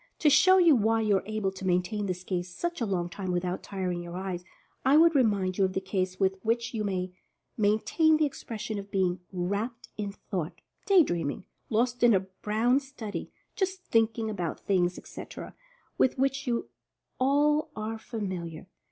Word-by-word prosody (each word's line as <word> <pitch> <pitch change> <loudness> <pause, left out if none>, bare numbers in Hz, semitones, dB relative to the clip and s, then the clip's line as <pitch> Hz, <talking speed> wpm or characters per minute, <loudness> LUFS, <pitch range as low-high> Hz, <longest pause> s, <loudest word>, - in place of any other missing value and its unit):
To 300 - +4
show 370 +6 +7
you 340 -5 +6
why 225 0 +2
you 210 -3 +3
are 190 - -6
able 215 -3 -1
to 190 0 -10
maintain 185 +3 0
this 180 -1 -3
gaze 180 -1 -3
such 345 - -4
a 230 - +1
long 180 -3 0
time 185 +1 -4
without 180 +1 -1
tiring 185 -3 -3
your 175 +1 -7
eyes, 185 -2 -4 0.4
I 270 +3 +5
would 330 +1 +6
remind 200 -9 +2
you - - +5
of 185 - -2
the 190 0 -3
ease 185 -1 0
with 190 -1 +1
which 230 +3 0
you 220 -2 -1
may 185 -2 -2 0.4
maintain 220 +10 +3
the 310 - +3
expression 220 -6 -5
of 200 0 -9
being 185 -2 +1
"wrapped 200 +6 -3
in 205 -1 -2
thought," 180 -5 -5 0.3
"day 385 -4 +7
dreaming," 170 - -2 0.3
"lost 240 +2 +1
in 240 -3 +6
a 190 - +3
brown 215 +6 +1
study," 265 -7 -7 0.3
"just 380 -2 -2
thinking 225 0 +2
about 180 -6 -3
things," 180 -2 +1
etc., - - -9 0.5
with 260 - +3
which 270 +1 0
you 235 -1 -1 0.5
all 295 +4 +3
are 220 +1 -4
familiar. 185 -8 -5
210 Hz, 180 wpm, -28 LUFS, 185-245 Hz, 0.5 s, show